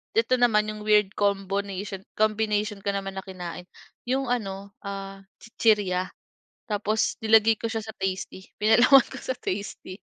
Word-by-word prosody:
ito 230 +3 +2
naman 215 -3 +3
'yong 215 - -8
weird 210 -2 +4
combonation 200 -1 -2
combination 215 -1 0
ko 200 - -2
naman 195 -1 -4
na - - -6
kinain 180 -1 -7 0.4
'yong 260 0 0
ano, 200 -4 -3
ah, 195 -1 -6 0.2
chichirya. 205 -5 +1 0.6
Tapos 215 -1 -1
nilagay 220 0 +4
ko 230 - -2
siya 225 -1 -3
sa 220 - -7
tasty 190 0 -4
pinalaman 240 +5 +6
ko - - -7
sa 260 - -3
tasty 190 -1 -5
205 Hz, 140 wpm, -26 LUFS, 195-220 Hz, 0.6 s, pinalaman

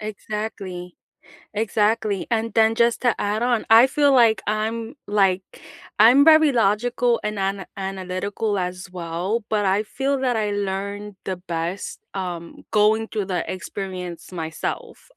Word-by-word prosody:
Exactly, 205 -4 -6 0.6
exactly. 210 -1 0
And 230 0 0
then 225 0 +4
just 235 0 +2
to 245 -3 +3
add 210 +3 -1
on, 240 -2 +1
I 230 +3 +8
feel 285 +1 +3
like 230 -4 +4
I'm, 225 +3 -2
like, 195 -2 +2 0.6
I'm 250 +6 +7
very 315 -2 +6
logical 235 +2 +1
and 210 -1 -2
ana 195 0 -2
analytical 195 +2 -3
as 180 0 -4
well, 180 +6 -3
but 210 -1 0
I 195 +2 +2
feel 270 +5 -1
that 250 -3 +1
I 215 -1 0
learn 200 0 -4
the 190 - -3
best, 175 +1 -4
um, 175 -3 -6
going 220 +1 +3
through 210 -3 -3
the 180 -3 -2
experience 185 -2 -6
myself. 160 -2 -5
210 Hz, 140 wpm, -22 LUFS, 190-225 Hz, 0.6 s, I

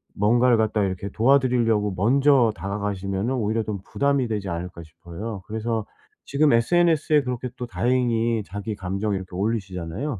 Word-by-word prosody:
뭔가를 120 +4 +3
갖다가 110 -2 +1
이렇게 95 +1 -4
도와드리려고 115 -4 +2
먼저 130 +4 +4
다가가시면은 100 +3 -3
오히려 110 -1 0
좀 105 -2 -4
부담이 140 -2 0
되지 105 -4 -3
않을까 85 0 -5
싶어요. 85 +6 -8
그래서 110 0 -2 0.4
지금 145 +2 +2
SNS에 155 +4 +3
이렇게 125 -2 -3
또 125 - -5
다행히 120 -2 0
자기 100 +3 -5
감정 100 +2 -2
이렇게 95 -1 -7
올리시잖아요. 100 - -3
110 Hz, 395 characters per minute, -24 LUFS, 100-125 Hz, 0.4 s, 먼저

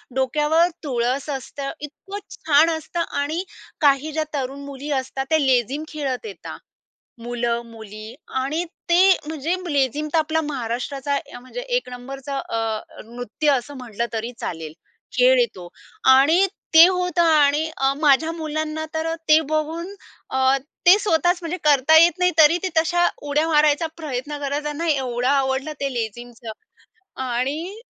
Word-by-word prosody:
डोक्यावर 300 +5 +2 0.2
तुळस 260 +1 -1
असतं, 275 0 -5
इतकं 390 +7 -8 0.2
छान 310 +1 +4
असतं 325 +1 -4 0.2
आणि 310 +6 -1 0.4
काही 290 +1 +3
ज्या 310 +1 -1
तरुण 275 0 -3
मुली 280 +1 -7
असतात 270 +1 -5
त्या 315 -1 +3
लेझीम 265 +2 +1
खेळत 285 - -4
येतात. 435 - -8 0.6
मुलं, 235 0 -1
मुली 220 0 -10 0.3
आणि 310 +6 -1 0.3
ते 370 +2 +6
म्हणजे 315 +2 -2 0.2
लेझीम 285 +2 0
तर - - +5
आपला 315 +1 +1
महाराष्ट्राचा 270 +1 -3
अ, 280 - -7
म्हणजे 255 - -8 0.2
एक - - -2
नंबरचा 270 +3 -7
अ, 225 -3 -2 0.2
नृत्य 245 +5 -2
असं 275 +2 -2
म्हटलं 235 -2 -4
तरी 230 +2 -3
चालेल, 160 -2 -5 0.5
खेळ - - +6
आहे 485 - +4
तो. 175 -1 -10 0.5
आणि 320 +9 +5 0.3
ते 330 +2 +10
होतं 360 -2 0
आणि 310 -1 +3
अ, 270 0 +2
माझ्या 315 +2 +3
मुलांना 310 -1 -3
तर 325 +1 -1
ते 310 +1 +7
बघून 325 +5 -2 0.4
अ, 265 +1 +3 0.3
ते 380 +4 +8
स्वतःच 355 -2 +2
म्हणजे 335 +2 -3
करता 295 +1 +5
येत 345 +2 +5
नाही, 360 0 +3
तरी 320 +2 +6
ते 375 - 0
तशा 345 +2 +3 0.2
उड्या 305 +3 +2
मारायचा 300 +1 +3
प्रयत्न 295 -2 -5
करतं, 285 +1 -2
त्यांना 300 +3 -3
एवढं 255 -4 0
आवडलं 275 +1 +1
ते 275 -1 -1
लेझीमचं. 235 0 -5 0.7
आणि 285 - -3
290 Hz, 145 wpm, -22 LUFS, 260-320 Hz, 0.7 s, ते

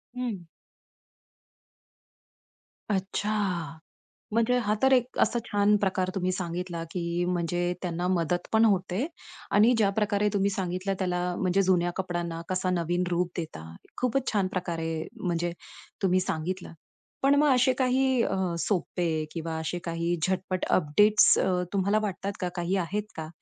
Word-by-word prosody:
हं. 220 -9 -4 2.4
अच्छा! 200 +1 -1 1.0
म्हणजे 230 +2 +3
हा 210 +1 +1
तर 265 0 +4
एक 250 0 +1
असा 240 - +3
छान 205 0 +3
प्रकार 185 -1 +1
तुम्ही 185 -1 0
सांगितला, 175 -1 -3
की 170 0 -1
म्हणजे 175 0 0
त्यांना 175 0 -2
मदत 175 -1 0
पण 220 +1 +6
होते 190 +4 +1 0.5
आणि 220 +5 +5
ज्या 205 -3 +4
प्रकारे 210 0 +1
तुम्ही 200 0 +2
सांगितलं 190 0 -2
त्याला 180 -1 0
म्हणजे 190 +1 +2
जुन्या 175 -2 +2
कपड्यांना 175 -3 -3
कसा 185 0 0
नवीन 175 0 0
रूप 175 0 0
देता. 155 - -5 0.3
खूपच 255 +1 0
छान 200 -3 +1
प्रकारे 165 -3 -3 0.2
म्हणजे 175 -1 0 0.5
तुम्ही 185 -1 +3
सांगितलं. 180 0 -3 0.5
पण 275 +1 +4
मग 295 0 +4
असे 255 +1 +4
काही 260 -1 +3
अ, - - 0 0.2
सोपे 165 -3 -1
किंवा 165 -1 -4
असे 165 +2 -3
काही 170 +1 -1
झटपट 185 0 -1
अपडेट्स 205 +7 +5
अ, - - +2 0.3
तुम्हाला 200 +2 +2
वाटतात 200 -1 -3
का? 180 - -1
काही 175 +2 -1
आहेत 205 +5 -2
का? 160 -1 -5
185 Hz, 140 wpm, -27 LUFS, 175-205 Hz, 2.4 s, पण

